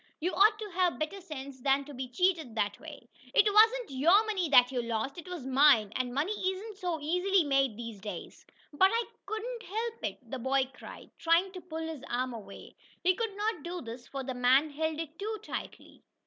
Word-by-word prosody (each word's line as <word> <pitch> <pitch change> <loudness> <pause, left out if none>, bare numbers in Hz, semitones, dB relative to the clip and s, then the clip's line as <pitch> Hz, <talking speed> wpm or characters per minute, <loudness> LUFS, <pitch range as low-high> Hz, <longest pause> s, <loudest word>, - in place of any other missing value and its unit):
"You 355 +4 -1
ought 425 +2 +5
to 425 -2 -7
have 360 -1 +1
better 310 +6 -4
sense 275 -6 -8
than 275 +1 +2
to 290 - -10
be 255 -1 -5
cheated 320 -3 0
that 205 -2 -1
way! 305 -6 -11 0.3
It - - +6
wasn't 450 - +5
your 370 +10 +6
money 385 -7 -1
that 250 -2 +6
you 250 -2 -1
lost, 235 +3 -2
it 345 - -11
was 355 -7 -6
mine, 265 -6 +5
and 255 -1 -1
money 290 +10 -1
isn't 390 +2 -3
so 350 -3 -2
easily 360 +5 +2
made 275 -6 +1
these 230 -4 -7
days!" 210 0 -8 0.3
"But 380 +6 +5
I 465 +1 +1 0.2
couldn't 460 +2 -4
help 455 +3 -4
it!" 200 -2 -3
the 265 - -3
boy 265 +1 +1
cried, - - -11
trying 335 +3 +3
to 370 -1 -8
pull 325 -2 -5
his 315 -5 -7
arm 250 +1 -1
away. 200 -4 -11 0.3
He 370 +1 +5
could 420 0 -3
not 425 -4 -1
do 350 +3 -5
this, 235 +1 -9
for 275 -1 -5
the 260 0 -4
man 255 +5 +3
held 315 +1 -2
it 325 0 -6
too 430 +2 -3
tightly. - - -7
315 Hz, 205 wpm, -30 LUFS, 260-380 Hz, 0.3 s, It